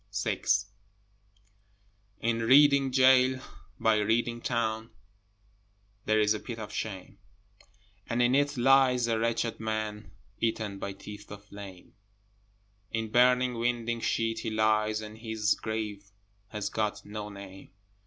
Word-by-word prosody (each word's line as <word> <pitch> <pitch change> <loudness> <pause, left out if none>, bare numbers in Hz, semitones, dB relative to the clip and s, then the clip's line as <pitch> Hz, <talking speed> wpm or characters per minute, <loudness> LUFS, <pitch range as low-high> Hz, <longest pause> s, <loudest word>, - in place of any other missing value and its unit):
VI - - -2 1.8
In 115 0 0
Reading 140 +3 +5
gaol 130 0 +5 0.4
by 110 -1 +3
Reading 115 +2 0
town 110 -2 -1 1.2
There 110 0 +3
is 105 0 +3
a 105 - -4
pit 120 +1 -7
of 110 -2 -7
shame, 95 -4 -6 0.9
And 120 - -1
in 120 +1 +3
it 145 +1 +2
lies 130 -1 +4
a 115 -1 0
wretched 115 0 -1
man 110 -2 -3 0.3
Eaten 110 -3 -2
by 100 - -4
teeth 105 +1 -11
of 105 0 -10
flame, 100 -3 -11 1.0
In 110 -1 -3
burning 125 +1 +4
winding 120 -1 -1
sheet 115 0 0
he - - -3
lies, 110 0 +1
And 110 0 -9
his 110 -2 0
grave 105 -2 -5 0.4
has 105 -1 -4
got 105 -1 -2
no 105 0 -6
name. 100 -1 -11
110 Hz, 125 wpm, -29 LUFS, 105-120 Hz, 1.8 s, Reading